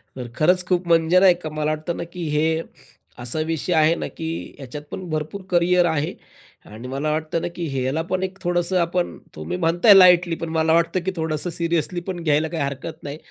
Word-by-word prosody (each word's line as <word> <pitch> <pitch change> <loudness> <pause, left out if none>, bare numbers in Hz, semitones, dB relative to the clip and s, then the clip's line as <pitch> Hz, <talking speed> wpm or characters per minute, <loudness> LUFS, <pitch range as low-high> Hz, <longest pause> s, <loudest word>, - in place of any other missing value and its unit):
तर 125 -2 -6
खरंच 180 +4 +3
खूप 180 -1 0
म्हणजे 165 +2 +4
नाही 185 -2 +6
का 155 - -3
मला 155 0 -1
वाटतं 155 +2 -3
ना, - - -3
की 170 0 -6
हे 160 +2 +1 0.6
असा 120 +6 -5
विषय 165 +2 -2
आहे 160 +1 +4
ना, - - -4
की 165 0 -6
ह्याच्यात 145 +2 -8
पण 185 -2 -6
भरपूर 155 +5 -4
करियर 175 0 +3
आहे 160 -2 -1 0.5
आणि 110 +4 -10
मला 140 +4 -2
वाटतं 160 +1 -2
ना, - - -2
की 175 - -3
ह्याला 130 +4 -1
पण 185 0 -1
एक 190 0 -4
थोडंसं 175 +1 0
आपण 175 +1 -1 0.2
तुम्ही 75 - -4
म्हणताय 175 +5 +5
लाईटली 180 -3 +6
पण 165 0 -5
मला 160 0 +2
वाटतं, 170 +2 +2
की 190 - 0
थोडंसं 160 0 -2
सीरियसली 170 +1 -1
पण 175 -3 -4
घ्यायला 155 0 +2
काही 160 -2 -3
हरकत 140 +4 -6
नाही. 145 +1 -6
165 Hz, 205 wpm, -22 LUFS, 155-175 Hz, 0.6 s, नाही